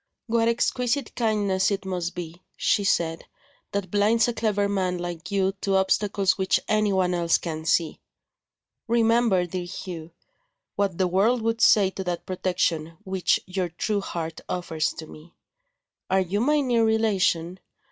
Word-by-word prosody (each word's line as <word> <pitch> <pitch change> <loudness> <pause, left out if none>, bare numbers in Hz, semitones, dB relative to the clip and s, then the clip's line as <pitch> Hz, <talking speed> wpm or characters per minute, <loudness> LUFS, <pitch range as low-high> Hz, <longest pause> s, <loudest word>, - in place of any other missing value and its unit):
"What 230 -1 +1
exquisite 245 +2 0
kindness 205 -5 +1
it 200 -1 -3
must 180 -2 -3
be," 175 0 -7 0.2
she 205 - +2
said, 165 -4 0 0.5
"that 200 -3 -3
blinds 215 +3 +3
a 240 - -1
clever 210 -3 0
man 185 -3 -1
like 175 -1 -6
you 195 -1 +1
to 195 -1 0
obstacles 195 0 +1
which 190 - +2
anyone 195 -4 +2
else 170 -1 +2
can 160 -2 -5
see! 165 0 +1 0.9
Remember, 230 -5 +3
dear 180 +1 -4
Hugh, 175 -2 -7 0.7
what 195 -4 0
the 185 - +2
world 215 +7 +2
would 230 0 -1
say 195 -3 +5
to 190 - -5
that 175 -1 -3
protection 175 -3 -1
which 190 -2 +1
your 180 -1 -2
true 200 +5 -2
heart 165 -4 -5
offers 165 -3 -1
to 160 - -8
me. 155 +2 -14 0.7
Are 190 0 +3
you 190 +2 -1
my 295 +5 +2
near 240 -4 +2
relation? 195 -6 +1
190 Hz, 150 wpm, -25 LUFS, 175-215 Hz, 0.9 s, say